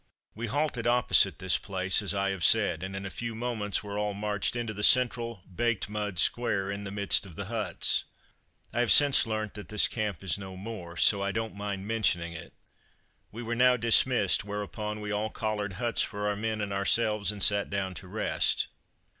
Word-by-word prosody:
We 115 +2 -5
halted 130 -1 -1
opposite 120 -8 +3
this 95 -1 +1
place, 95 0 +1
as 100 - -1
I 100 0 0
have 95 -3 -4
said, 80 - +3
and 95 +1 -5
in 95 0 -5
a 100 - -5
few 115 +2 -5
moments 110 -4 -2
were 100 0 -4
all 105 -1 -1
marched 105 +1 -1
into 115 -2 -3
the 105 - -6
central, 115 -3 +3
baked 115 +2 -1
mud 105 -3 -3
square, 100 -1 0
in 100 0 -5
the - - -5
midst 100 0 +2
of 95 -5 -9
the 100 - -5
huts. 110 +1 0 0.7
I 120 - -1
have 120 -2 +3
since 145 -4 +6
learnt 110 -2 -3
that 105 -1 -9
this 105 -1 +3
camp 105 -6 -3
is 95 +1 -1
no 95 -2 -8
more, 95 -4 -8
so 100 +3 +4
I 100 0 0
don't 115 +2 -3
mind 100 -1 -5
mentioning 90 -7 0
it. 85 0 -10 0.8
We 115 +3 -7
were 115 +1 -3
now 125 +1 +4
dismissed, 115 -3 +3
whereupon 105 +1 -5
we 105 0 -4
all 105 +1 -1
collared 105 -2 -3
huts 115 +5 -1
for 105 -1 -2
our 105 - 0
men 110 +1 -2
and 100 -1 -3
ourselves, 105 0 +2
and 100 -2 -5
sat 100 -1 +3
down 95 -1 -2
to 90 - -10
rest. 105 +4 0
105 Hz, 200 wpm, -29 LUFS, 100-115 Hz, 0.8 s, since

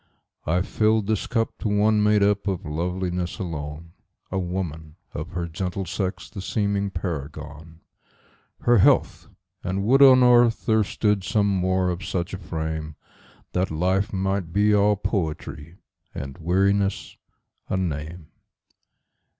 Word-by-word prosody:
I 90 +3 +2
filled 110 +1 +1
this 110 -1 -1
cup 115 -2 -1
to - - -2
one 105 +1 +3
made 105 -1 +4
up 100 0 +1
of 95 -4 -2
loveliness 90 +3 -2
alone,A 85 +1 -7
woman, 85 -4 -4 0.2
of 75 +3 -5
her 85 -1 -2
gentle 90 +3 -4
sex 95 +3 -3
the 95 - -8
seeming 100 0 -1
paragon—Her 80 - -4
health! - - +3 0.4
and 95 +2 -2
would 130 +6 +4
on 130 -2 +8
earth 120 -2 +4
there 110 -1 +3
stood 105 -1 0
some 105 +2 +1
more 95 -2 +1
of 90 +2 -5
such 90 -1 -3
a 95 - -4
frame, 80 -2 -4 0.6
That 90 +1 0
life 95 +5 0
might 95 -2 -1
be 105 +3 +3
all 105 0 +4
poetry, 80 -5 -4 0.4
and 70 0 -6
weariness 95 +4 +1 0.5
a 95 - 0
name. 80 -2 -4
95 Hz, 130 wpm, -24 LUFS, 85-100 Hz, 0.6 s, on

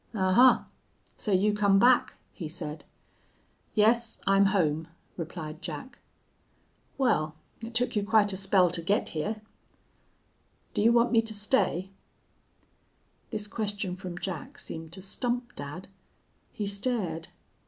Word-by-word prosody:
"'Ahuh! 205 +6 +5 0.5
So 210 - -4
you 200 +2 +3
come 200 -1 +3
back,' 245 +4 +4 0.2
he 170 - -6
said. 155 -1 -6 0.9
"'Yes, 230 +2 +3
I'm 195 0 +5
home,' 165 -5 +1 0.3
replied 165 -1 -6
Jack. 260 - -7 1.0
"'Wal, 185 - +1 0.3
it 230 +1 -7
took 245 0 +1
you 205 - +1
quite 205 -1 +3
a - - -2
spell 190 -2 +3
to 170 - -1
get 195 +5 0
hyar.' 210 +8 -3 1.3
"'Do - - 0
you 225 +2 +5
want 235 0 +4
me 230 -2 +5
to 225 -1 -4
stay?' 205 -4 +1 1.4
"This 210 -1 -3
question 205 -3 -2
from 180 -2 -7
Jack 225 - -5
seemed 160 - -7
to 190 0 -6
stump 245 +4 -1
dad. 145 +6 -7 0.6
He 210 - -4
stared. 200 -6 -1
200 Hz, 130 wpm, -28 LUFS, 175-225 Hz, 1.4 s, Ahuh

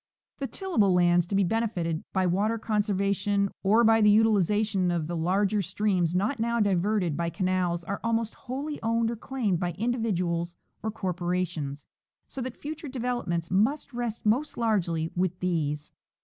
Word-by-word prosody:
The 275 - -2
tillable 230 - +1
lands 175 -1 +4
to 195 - -2
be 200 - +4
benefited 180 -6 -1
by 190 -1 +1
water 205 +6 +1
conservation 200 -2 0
or 215 +4 +4
by 225 0 +5
the 210 - +6
utilization 210 -2 +3
of 170 -3 0
the 170 +2 -4
larger 195 +5 +1
streams 185 -2 0
not 210 +8 0
now 235 +1 0
diverted 195 -4 +1
by 170 +1 -1
canals 180 -2 0
are 200 +3 -4
almost 230 -1 0
wholly 280 +4 -5
owned 230 0 +1
or - - -3
claimed 225 -6 -1
by 175 -1 -1
individuals 180 -7 -1 0.3
or 220 - -2
corpora 180 -3 -1
tions, 145 -3 -6 0.4
so 270 - -6
that 255 -1 -5
future 305 +1 -6
developments 240 -10 -2
must 250 +9 +1
rest 235 -2 -4
most 245 +8 +1
largely 170 -8 0
with 180 0 -1
these. 155 -5 -1
200 Hz, 160 wpm, -27 LUFS, 175-225 Hz, 0.4 s, the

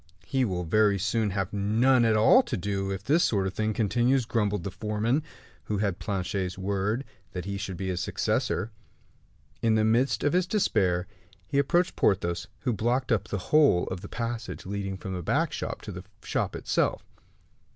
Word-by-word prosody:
"He 130 -2 +1
will 90 -4 -2
very 105 +4 +3
soon 110 +2 0
have 95 0 -2
none 115 +5 +3
at 110 -1 +3
all 110 - +7
to 130 - -4
do, 95 +1 -2
if 95 0 -4
this 155 +9 +3
sort 100 -3 +1
of 95 - -2
thing 110 +2 0
continues," 120 +4 +2
grumbled 105 -5 0
the 100 - -4
foreman, 110 +8 0 0.4
who 105 - -1
had 100 -3 -1
Planchet's 95 -2 -2
word 100 +6 -1 0.3
that 90 -1 -4
he 100 0 -3
should 100 -2 -5
be 95 0 -3
his 90 -1 -2
successor. 110 - -1 0.9
In 115 -1 +3
the 110 0 +3
midst 120 +5 +2
of 145 - +2
his 180 0 +2
despair, 95 - +1 0.4
he 140 - 0
approached 175 +5 +2
Porthos, 85 -3 +1
who 125 -3 0
blocked 120 +5 0
up 110 -2 +1
the 105 - -2 0.2
whole 145 -13 +5
of 95 -1 -5
the 100 - -9
passage 120 0 -4
leading 95 0 -3
from 95 -1 -6
the 90 - -3
back - - +1
shop - - -4
to - - -6
the - - -7 0.2
shop - - -1
itself. - - 0
105 Hz, 185 wpm, -27 LUFS, 95-120 Hz, 0.9 s, all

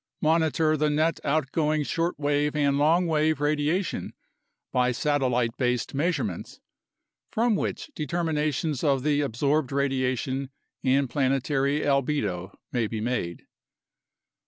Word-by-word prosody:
Monitor 160 0 +2
the 150 0 +1
net 155 +2 +1
outgoing 155 +1 +1
shortwave 150 -2 0
and 140 -1 +2
long 165 +5 +4
wave 155 -2 +1
radiation 150 +5 0 0.6
by 125 0 +2
satellite 125 -4 0
based 125 -1 0
measurements, 140 - -2 0.7
from 230 0 +2
which 300 - -3
determinations 155 - -1
of 135 -4 +2
the 145 -1 +2
ab 140 -5 -2
sorbed 140 +2 +1
radiation 135 -1 -1 0.3
and 135 +1 +3
planetary 135 +2 +1
albedo 130 -11 0 0.2
may 120 -3 0
be 110 0 -4
made. 110 -7 -3
145 Hz, 110 wpm, -26 LUFS, 130-155 Hz, 0.7 s, long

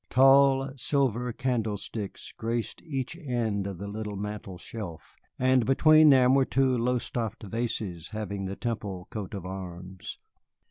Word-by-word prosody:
Tall 135 +1 +5
silver 125 -2 0
candlesticks 110 -4 -3
graced 115 0 -3
each 135 -2 -4
end 115 - -1
of 100 -3 -5
the 100 +3 -6
little 105 0 -5
mantel 105 -2 -5
shelf, 85 - -8 0.2
and 130 -1 +4
between 155 +5 +6
them 130 -2 +6
were 135 0 +5
two 130 -1 +2
Lowestoft 120 -2 -1
vases 105 -6 -3
having 100 -2 -4
the 95 +1 -4
Temple 100 -6 -4
coat 105 -2 -5
of 95 -3 -6
arms. 90 -1 -7
115 Hz, 135 wpm, -28 LUFS, 100-130 Hz, 0.2 s, between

